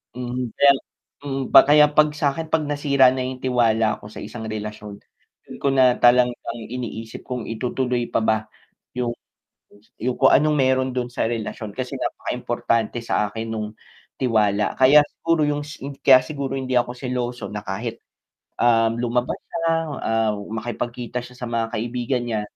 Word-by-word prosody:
Mhm, 125 -1 -4
kaya 140 0 +8
lang - - -7 0.4
mm 135 -1 -3
pa - - +12
kaya 150 +1 +6
pag 150 0 +5
sakin 150 +2 -2
pag 160 -1 +1
nasira 145 -2 +3
na 130 - -2
yung 130 0 -4
tiwala 115 -4 +2
ko 105 - -10
sa - - -12
isang 120 -2 -7
relasyon, 105 -1 -6 0.5
dun - - -9
ko 140 - +2
na 130 -2 +5
talagang 125 0 +5 0.3
iniisip 115 -2 -6
kung 125 -3 -5
itutuloy 125 +1 -2
pa - - +2
ba, 110 0 +3 0.6
yung 120 -1 -1 0.9
yung 125 +2 -1
kung 135 - +5
anong 150 0 +4
meron 130 -1 +2
dun 125 -1 -2
sa - - -1
relasyon 110 -2 -4
kasi 130 -1 -4
napaka-importante 115 0 -2
sa 105 - 0
akin 115 +1 -5
nung 110 -1 -3 0.5
tiwala 105 -4 +1
kaya 135 +3 +8
siguro 165 -1 -1
yung 145 0 -1 0.4
kaya 130 -2 +9
siguro 140 -1 -4
hindi 130 -1 -2
ako 120 - -2
seloso 125 -1 -4
na 105 0 -5
kahit, 115 +4 -4 0.6
um, 115 -1 +3
lumabas 120 0 -1
siya, 170 - -5 0.4
ah, 115 -1 +1 0.2
makipag-kita 120 +2 -4
siya 125 - -13
sa 125 -1 -5
mga 115 -1 -1
kaibigan 120 +3 -2
niya, 110 -2 -1
125 Hz, 160 wpm, -22 LUFS, 115-130 Hz, 0.9 s, pa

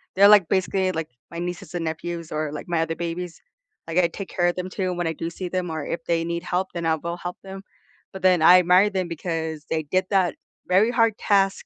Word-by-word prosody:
they're, 200 +1 +7
like, 205 -4 +7
basically, 190 0 +1
like, 160 -4 -4 0.2
my 170 - -9
nieces 175 -1 -5
and 170 -1 -2
nephews 165 +1 -5
or, 155 -1 -2
like, 150 - -7
my 170 -2 0
other 165 0 -2
babies. 170 0 -5 0.5
Like, 165 +2 +1
I 175 - +4
take 190 +3 -7
care 175 -1 +1
of 175 - 0
them 180 0 -4
too 185 -1 -2
when 175 0 -2
I 165 - -1
do 165 +1 -4
see 180 +2 -6
them 180 0 -2
or 160 -2 -4
if 165 0 -4
they 165 -1 +1
need 170 0 -2
help 180 +1 -1
then 170 -1 -4
I'll 160 - +2
go 170 +2 -4
help 175 0 -6
them, 195 0 -8 0.5
but 190 - -8
then 180 -3 +4
I 180 +3 +8
admire 180 +3 +5
them 190 -3 -2
because 160 -2 -4
they 160 -1 -1
did 185 +6 0
that 190 -3 +2 0.3
very 190 +5 +4
hard 230 -3 +3
task 195 -2 +2
175 Hz, 240 wpm, -24 LUFS, 165-185 Hz, 0.5 s, I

